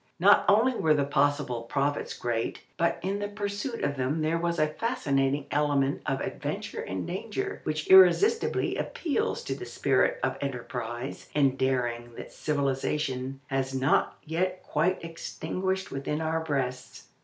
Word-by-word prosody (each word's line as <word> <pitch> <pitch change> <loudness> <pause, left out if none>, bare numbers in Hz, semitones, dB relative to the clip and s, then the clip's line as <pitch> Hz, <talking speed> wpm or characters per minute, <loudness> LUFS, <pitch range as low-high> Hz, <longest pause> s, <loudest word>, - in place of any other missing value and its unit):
Not - - +6
only 225 +6 +5
were 155 -9 +3
the 145 - +2
possible 140 -3 +1
profits 140 +5 -1
great, 115 -2 -2
but 170 0 +1
in 195 +2 -1
the 205 - -2
pursuit 205 +4 -4
of 140 -1 0
them 135 +5 0
there 165 +2 +1
was 170 0 -1
a 155 - +4
fascinating 145 - 0
element 145 -1 +1
of 135 0 0
adventure - - -4
and 95 -1 -4
danger, 230 - -4
which 155 0 -2
irresistibly 190 - +5
appeals 435 +8 -1
to - - -2
the - - -7
spirit - - +2
of - - 0
enterprise 125 -1 -5
and 135 -3 +3
daring 120 -3 -1
that - - -9
civilization 135 -2 -1
has 135 -1 -2
not 130 +2 +2
yet 180 +4 -1
quite 170 +5 0
extinguished 185 +3 -3
within 140 +2 -2
our 160 0 0
breasts. 130 -4 -3
150 Hz, 145 wpm, -28 LUFS, 135-185 Hz, -, Not